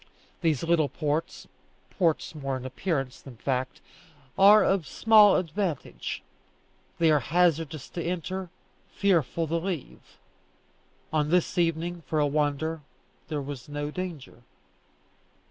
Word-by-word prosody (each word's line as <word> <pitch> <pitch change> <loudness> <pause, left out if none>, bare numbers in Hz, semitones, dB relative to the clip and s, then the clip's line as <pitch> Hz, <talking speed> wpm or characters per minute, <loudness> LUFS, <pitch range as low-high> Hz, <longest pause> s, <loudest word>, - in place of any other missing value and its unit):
These 160 -5 +1
little 165 -3 +2
ports 150 +2 -3 0.4
(ports 170 -4 0
more 135 -3 -3
in 130 - -8
appearance 135 -1 -3
than 130 -4 -12
fact) 130 +1 -2 0.5
are 205 +2 +7
of 190 -5 +1
small 215 -3 +6
advantage. 175 - -3 0.7
They 165 -1 +4
are 150 - +4
hazardous 160 -1 +1
to 170 - -4
enter, 180 +1 -3 0.4
fearful 170 -4 +1
to 165 +2 -1
leave. 170 -4 -6 1.0
On 150 -1 +1
this 180 +1 +2
evening, 170 +1 0
for 155 - -1
a 150 - +3
wonder, 150 +2 -1 0.5
there 150 -3 -3
was 140 0 -8
no 145 0 -4
danger. 160 -9 -7
160 Hz, 120 wpm, -27 LUFS, 145-175 Hz, 1.0 s, are